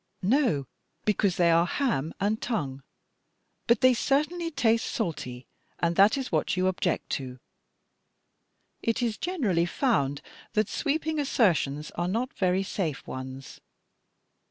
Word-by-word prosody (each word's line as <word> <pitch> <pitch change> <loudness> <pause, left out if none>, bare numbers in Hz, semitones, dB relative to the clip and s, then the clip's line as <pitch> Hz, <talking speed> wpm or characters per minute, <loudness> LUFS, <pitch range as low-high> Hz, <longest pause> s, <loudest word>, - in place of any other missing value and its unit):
"No, 220 - +2 0.4
because 200 -3 +2
they 170 -1 +4
are 170 +1 +4
ham 170 - 0
and 210 +2 0
tongue. 140 - -2 0.9
But 235 -1 +4
they 255 0 +6
certainly 305 +7 0
taste 230 -7 +2
salty, 130 - -4 0.3
and 170 0 0
that 200 +7 +5
is 265 -2 -4
what - - 0
you 185 - +2
object 185 -2 -1
to. 130 -2 -4 1.4
It 230 +2 0
is 230 -3 0
generally 220 - 0
found 145 - 0 0.3
that 215 0 +1
sweeping 315 +1 -1
assertions 170 - +1
are 175 +1 -2
not 230 +7 -1
very 185 0 +1
safe 170 -7 -3
ones. 130 0 -8
195 Hz, 130 wpm, -27 LUFS, 165-250 Hz, 1.4 s, they